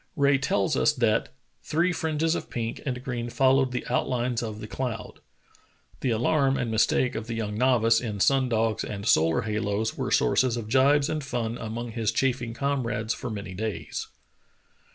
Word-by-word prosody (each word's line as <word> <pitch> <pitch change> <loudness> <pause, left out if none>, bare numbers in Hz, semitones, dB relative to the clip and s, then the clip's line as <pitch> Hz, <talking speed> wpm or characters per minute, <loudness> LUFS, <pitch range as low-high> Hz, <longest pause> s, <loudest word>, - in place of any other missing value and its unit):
Rae 140 -3 +3
tells 100 -7 +1
us 150 - +3
that 115 -5 +1 0.3
"three 170 +3 +1
fringes 160 0 0
of - - -4
pink 115 -1 -4
and 125 -1 -3
green 120 -2 -3
followed 130 +1 +3
the 125 - -3
outlines 125 -1 0
of 110 -2 -5
the 105 - -6
cloud. 115 -2 -5 0.4
" - - -33
The 130 - 0
alarm 135 +4 +2
and 115 - -2
mistake 110 +3 +2
of 110 0 -5
the 115 - -3
young 105 -2 -3
novice 115 -2 +3
in 105 -4 -4
sun 135 +4 +3
dogs 115 -1 0
and 100 -1 -5
solar 80 -3 +4
halos 110 0 -1
were - - -3
sources 125 -2 +2
of 110 -2 -5
gibes 140 +3 +4
and 155 -2 -2
fun 120 -4 -2
among 115 +2 -5
his 110 -2 -1
chaffing 120 -3 -1
comrades 120 -5 -1
for 125 - -6
many 100 -3 -6
days. 110 +2 -4
120 Hz, 175 wpm, -26 LUFS, 110-130 Hz, 0.4 s, solar